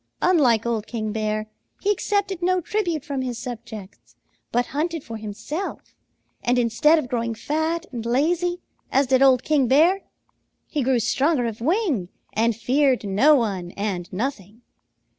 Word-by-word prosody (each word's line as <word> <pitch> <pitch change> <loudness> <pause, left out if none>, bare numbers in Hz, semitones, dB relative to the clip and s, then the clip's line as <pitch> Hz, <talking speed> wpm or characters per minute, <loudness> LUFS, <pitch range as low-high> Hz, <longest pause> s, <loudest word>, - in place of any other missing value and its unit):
Unlike 255 - +4
old 225 -2 -1
King 215 -3 -3
Bear, 215 0 -1 0.3
he 405 - +1
accepted 390 -2 -1
no 370 +1 +2
tribute 345 -5 -2
from 275 -3 -2
his 250 -2 -3
subjects 225 -4 -9 0.4
but 245 +1 +2
hunted 320 +1 -1
for 225 -1 -7
himself, 220 - -6 0.5
and 245 +1 +2
instead 245 +7 +4
of 305 - -2
growing 235 -2 -2
fat 315 +7 -1
and 235 -4 -5
lazy, 345 +9 +1 0.3
as 275 +1 +3
did 260 0 +3
old 260 -2 +5
King 290 -4 +2
Bear, 330 +10 +4 0.6
he 300 - -2
grew 255 -1 +2
stronger 260 +4 +1
of 225 -1 -4
wing 305 - 0 0.2
and 230 +1 +2
feared 255 +3 +2
no 250 +11 +5
one 195 -8 -1
and 195 -4 -3
nothing. 220 0 -4
255 Hz, 150 wpm, -23 LUFS, 225-315 Hz, 0.6 s, old